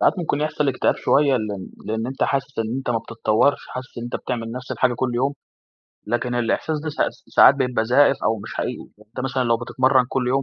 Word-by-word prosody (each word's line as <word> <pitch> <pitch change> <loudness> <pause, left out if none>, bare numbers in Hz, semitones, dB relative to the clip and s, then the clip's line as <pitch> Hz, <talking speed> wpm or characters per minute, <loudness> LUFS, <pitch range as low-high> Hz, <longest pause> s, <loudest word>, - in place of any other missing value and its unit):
ساعات - - +4
ممكن 155 -4 -1
يحصل 150 -1 0
اكتئاب 125 - +1
شوية، 140 -1 +3
لأن 105 -4 -4 0.2
لأن 110 +2 -2
أنت 135 +1 -4
حاسس 135 -1 -1
إن 115 +2 -1
أنت 130 - -3
ما 115 - +1
بتتطورش، 115 +3 +1
حاسس 130 -1 -8
إن 120 - -5
أنت 120 - -3
بتعمل 115 -2 -4
نفس 125 +1 -7
الحاجة 125 -1 +1
كل 125 0 -2
يوم، 135 +4 +1 0.7
لكن 120 +1 -1
الإحساس 135 +6 0
ده - - -2
س - - -10 0.2
س - - -23
ساعات 140 - +9
بيبقى 125 -4 0
زائف 135 +4 +4
أو 110 0 +1
مش - - -8
حقيقي. - - -4 0.2
أنت 120 - -7
مثلًا 130 -1 0
لو 115 -1 +3
بتتمرن 130 +2 +2
كل 125 -2 -1
يوم، 135 +2 +1
125 Hz, 220 wpm, -22 LUFS, 115-135 Hz, 0.7 s, ساعات